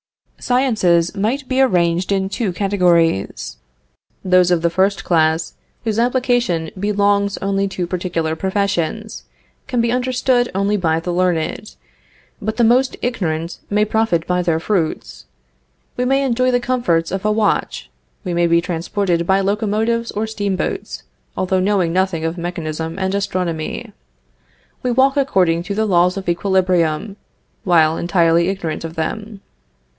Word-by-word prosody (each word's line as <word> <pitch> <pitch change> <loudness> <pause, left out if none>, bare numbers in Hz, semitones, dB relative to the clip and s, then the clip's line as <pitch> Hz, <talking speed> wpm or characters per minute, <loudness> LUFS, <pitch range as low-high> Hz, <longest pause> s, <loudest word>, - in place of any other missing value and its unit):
Sciences 215 -10 +2
might 240 +7 -1
be 260 0 +1
arranged 180 -6 +2
in 190 -1 +1
two 200 0 -2
categories. 175 - +1 0.7
Those 185 -1 +4
of 175 -2 +1
the 170 - +2
first 190 +3 +1
class 160 -1 +1 0.3
whose 220 -1 -1
application 245 -9 +1
belongs 200 0 +1
only 195 0 0
to 185 -2 -3
particular 170 -3 -2
professions, 200 +3 -2 0.4
can 250 -3 -1
be 230 0 +1
understood 250 0 +1
only 200 +2 +1
by 165 -4 +1
the 175 +1 -3
learned; 180 +3 -1 0.7
but 215 +2 -3
the 240 - +3
most 250 +3 +3
ignorant 170 -8 -2
may 210 +1 +2
profit 215 -6 0
by 180 0 0
their 170 -2 0
fruits. 175 -3 -2 0.7
We 250 - -1
may 270 +2 +2
enjoy 255 -1 +1
the 245 -1 +2
comforts 240 -11 0
of 190 +1 -3
a 215 - +2
watch; 215 0 -1 0.3
we 180 -3 -3
may 170 0 +2
be 170 0 +4
transported 170 0 -1
by 195 +1 +3
locomotives 220 +3 0
or 215 +2 -2
steamboats, 205 -4 -3 0.3
although 185 0 +1
knowing 185 -3 +1
nothing 185 -3 0
of 165 +2 -3
mechanism 165 -1 -4
and 190 0 -1
astronomy. 180 -5 -3 0.9
We 250 - -1
walk 265 +3 +3
according 185 -12 +2
to 200 +3 -5
the 220 +1 +1
laws 180 -1 +2
of 195 - -6
equilibrium, 180 0 +1 0.5
while 160 -3 +3
entirely 170 -1 +2
ignorant 180 -6 -4
of 165 0 -6
them. 205 +5 -4
190 Hz, 140 wpm, -19 LUFS, 170-215 Hz, 0.9 s, Those